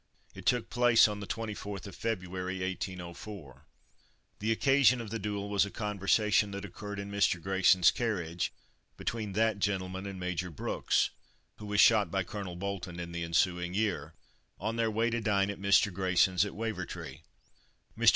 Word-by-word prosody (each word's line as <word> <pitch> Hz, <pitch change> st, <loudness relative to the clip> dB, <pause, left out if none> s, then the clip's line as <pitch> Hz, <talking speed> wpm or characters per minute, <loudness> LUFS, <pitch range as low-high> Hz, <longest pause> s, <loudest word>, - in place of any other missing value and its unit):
It 95 Hz, 0 st, -9 dB
took 120 Hz, -2 st, +1 dB
place 120 Hz, -2 st, +6 dB
on 105 Hz, -1 st, -4 dB
the 100 Hz, -, -7 dB
24th 105 Hz, -3 st, -5 dB
of 100 Hz, -, -9 dB
February, 95 Hz, -4 st, -3 dB
1804. 90 Hz, -5 st, -6 dB, 0.7 s
The 110 Hz, +2 st, 0 dB
occasion 130 Hz, +1 st, +4 dB
of 110 Hz, -3 st, -6 dB
the 115 Hz, -, -2 dB
duel 100 Hz, 0 st, -3 dB
was 100 Hz, -1 st, +3 dB
a 100 Hz, -, -3 dB
conversation 105 Hz, +1 st, +1 dB
that 100 Hz, 0 st, -6 dB
occurred 105 Hz, -1 st, -7 dB
in 100 Hz, 0 st, -5 dB
Mr. 100 Hz, -3 st, +2 dB
Grayson's 95 Hz, 0 st, +4 dB
carriage, 90 Hz, -8 st, -2 dB, 0.5 s
between 110 Hz, -4 st, -3 dB
that 110 Hz, 0 st, +2 dB
gentleman 95 Hz, -1 st, -2 dB
and 95 Hz, -1 st, -6 dB
Major 90 Hz, 0 st, -2 dB
Brooks 80 Hz, -, 0 dB, 0.5 s
(who 105 Hz, -, -9 dB
was 105 Hz, 0 st, +3 dB
shot 110 Hz, -3 st, +5 dB
by 95 Hz, -1 st, 0 dB
Colonel 95 Hz, -2 st, -6 dB
Bolton 95 Hz, -2 st, -5 dB
in 85 Hz, -1 st, -5 dB
the 85 Hz, 0 st, -3 dB
ensuing 90 Hz, +1 st, +1 dB
year), 90 Hz, -8 st, -1 dB, 0.4 s
on 110 Hz, +4 st, -2 dB
their 115 Hz, -1 st, +1 dB
way 115 Hz, +2 st, +1 dB
to 120 Hz, 0 st, -1 dB
dine 100 Hz, -2 st, +2 dB
at 100 Hz, -, -9 dB
Mr. 100 Hz, 0 st, +4 dB
Grayson's, 95 Hz, +1 st, +3 dB
at 100 Hz, -, -6 dB
Wavertree. 110 Hz, -10 st, -5 dB, 0.8 s
Mr. -, -, +6 dB
100 Hz, 165 wpm, -31 LUFS, 90-110 Hz, 0.8 s, place